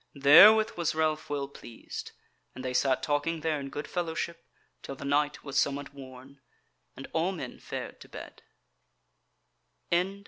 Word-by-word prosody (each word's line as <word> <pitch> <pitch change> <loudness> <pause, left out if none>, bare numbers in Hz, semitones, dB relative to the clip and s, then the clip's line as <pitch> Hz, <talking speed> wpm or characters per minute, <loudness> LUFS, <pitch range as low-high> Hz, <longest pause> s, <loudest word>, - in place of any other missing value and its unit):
Therewith 200 +12 +7
was 170 -2 -1
Ralph 155 -1 0
well 140 -1 -2
pleased, 120 -4 -9 0.4
and 130 - -8
they 130 - -2
sat 130 0 +1
talking 155 +2 -1
there 155 -2 0
in 135 -1 -6
good 145 +2 -6
fellowship 170 -1 -3 0.4
till 135 - -7
the 140 - -9
night 145 +1 0
was 140 -2 -1
somewhat 140 0 -1
worn, 135 0 -13 0.5
and - - -8
all 165 +4 +1
men 145 -9 -7
fared - - -7
to - - -13
bed. - - -10
145 Hz, 145 wpm, -29 LUFS, 140-160 Hz, 0.5 s, Therewith